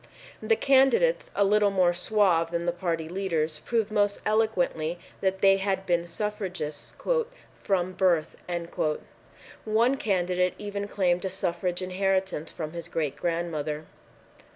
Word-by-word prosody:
The 450 - +3
candidates, 270 - +3
a 200 - +3
little 205 +1 +4
more 185 -3 +3
suave 180 -3 +2
than 170 0 -2
the 175 - +2
party 170 -2 -2
leaders, 165 -4 -1
proved 225 +1 -1
most 205 -1 +1
eloquently 180 -7 +1 0.2
that 190 0 0
they 195 0 +6
had 190 -1 -1
been 175 -1 +1
suffragists 185 -6 -4 0.6
"from 185 -2 -1
birth." 180 -4 +2 1.3
One 230 +5 +2
candidate 180 -4 +1
even 205 -1 -4
claimed 180 -3 +1
a 190 - -1
suffrage 180 -1 -2
inheritance 190 -3 -1
from 155 -1 -6
his 170 -1 -6
great 150 -5 -2
grandmother. 155 -2 -2
185 Hz, 130 wpm, -27 LUFS, 170-205 Hz, 1.3 s, they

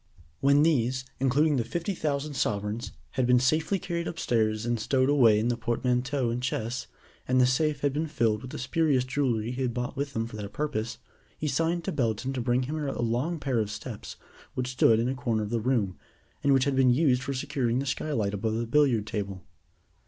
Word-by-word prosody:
When 140 +2 +4
these, 130 -5 +1
including 140 +3 +3
the 120 - +1
fifty 170 - -3
thousand 150 -3 -2
sovereigns, 105 -2 -2 0.2
had 130 -2 0
been 125 0 +5
safely 155 +9 +2
carried 170 -2 -3
upstairs 110 -8 0
and 120 -1 0
stowed 130 +4 +2
away 120 -7 +5
in 110 +3 +1
the 120 - +1
portmanteaux 125 +2 0
and 120 +1 -2
chests, 120 -1 -2 0.4
and 130 0 +3
the 125 - +6
safe 145 +3 +1
had 145 -2 +1
been 155 +3 -1
filled 115 -8 +1
with 130 - -8
the - - -6
spurious 140 0 +1
jewelry 125 -4 -1
he 125 +1 -4
had 125 -2 -1
brought 125 +2 -3
with 140 0 -3
him 115 0 0
for 115 -1 -8
that 100 -1 -6
purpose, 130 -7 -2 0.4
he 155 - -2
signed 165 +4 0
to - - -2
Belton 125 -1 -1
to 130 - -2
bring 120 +2 +1
him 150 +5 -3
a 140 -2 -3
long 120 +9 0
pair 135 -5 0
of 105 -2 -1
steps - - -7 0.4
which 125 0 -2
stood 115 -3 +4
in 115 - +1
a 130 - 0
corner 120 -4 -1
of 105 - -5
the 115 -1 0
room, 110 -6 0 0.4
and 140 - +3
which 135 -1 +4
had 140 0 0
been 130 -1 +5
used 130 -1 +3
for 135 +1 -3
securing 130 -3 -1
the 135 - -1
skylight 120 -8 -1
above 110 +2 -1
the 115 +1 -1
billiard 125 -4 +3
table. 100 -3 -4
125 Hz, 210 wpm, -28 LUFS, 115-140 Hz, 0.4 s, the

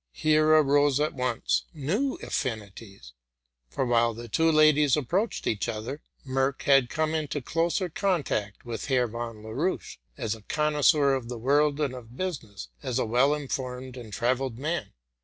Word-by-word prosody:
Here 155 - +3
arose 145 -2 +4
at 150 +1 0
once 125 -3 0
new 195 - -1
aflinities; 100 - -5 0.6
for 130 - -1
while 120 -1 +2
the 120 +1 -8
two 160 +8 +2
ladies 155 -2 +5
approached 180 - -1
each 110 +2 -1
other, 115 +7 -5 0.3
Merck 135 +1 0
had 135 -3 +4
come 155 0 -1
into 155 -2 -2
closer 165 - 0
contact 155 - -1
with 115 -2 -5
Herr 130 -3 +2
von 115 -1 -6
Laroche 135 +12 -3 0.2
as 115 -5 -2
a 110 - -10
connoisseur 150 +1 +3
of 130 -3 -3
the 125 - -4
world 145 +4 +2
and 145 -4 0
of 125 -1 -11
business, 115 - -5
as 125 - -2
a 130 - +1
well 125 +6 +3
informed 130 -3 -5
and 120 -4 -9
travelled 125 +3 -1
man. 155 +6 -3
135 Hz, 160 wpm, -27 LUFS, 120-150 Hz, 0.6 s, ladies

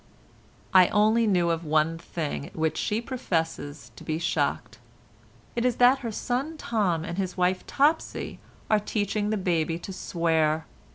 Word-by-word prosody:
I 185 -2 +8
only 220 +2 +3
knew 175 -4 +3
of 165 0 -2
one 155 +1 +1
thing 155 -4 -4
at - - -16
which 160 -1 0
she 210 +2 -1
professes 165 - -3
to - - -12
be 155 - -2
shocked. 170 - -1 0.8
It 235 - 0
is 250 -2 +2
that 250 +2 +5
her 235 -4 -4
son 265 +8 -2
Tom 190 - 0
and 175 +3 -4
his 185 -1 -3
wife 180 +1 +1
Topsy 300 +3 0 0.3
are 215 - +3
teaching 210 0 -1
the 215 - 0
baby 165 -3 0
to 180 +3 -8
swear. 160 -3 0
185 Hz, 160 wpm, -26 LUFS, 165-220 Hz, 0.8 s, I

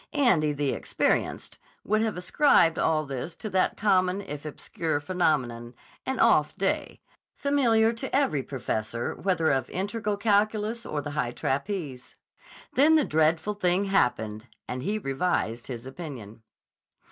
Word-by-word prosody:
Andy, 180 - +3
the 145 -1 -1
Experienced, - - -1 0.2
would 215 +2 +1
have 220 -4 -1
ascribed 180 - +3
all 155 -1 +1
this 140 +4 -5
to 215 - -6
that 185 -1 +1
common 190 -2 +2
if 150 -5 -7
obscure 155 +1 -3
phenomenon, 130 -9 -1 0.3
an 265 0 -1
"off - - +4
day," - - -2 0.3
familiar 235 -6 +2
to 260 +4 -4
every 270 - +2
professor 115 -3 -3
whether 180 -5 +1
of 135 -2 0
integral 205 +2 -2
calculus 215 +2 +1
or 150 - -2
the 145 - -6
high 125 -5 -1
trapeze. 140 -2 -3 0.6
Then 300 +5 +5
the 310 - +4
dreadful 160 +6 +1
thing 185 -1 +1
happened, 110 - 0 0.2
and 125 0 -4
he 205 +10 -1
revised 135 - -1
his 120 -2 -7
opinion. 130 - -9
170 Hz, 135 wpm, -27 LUFS, 135-210 Hz, 0.6 s, Then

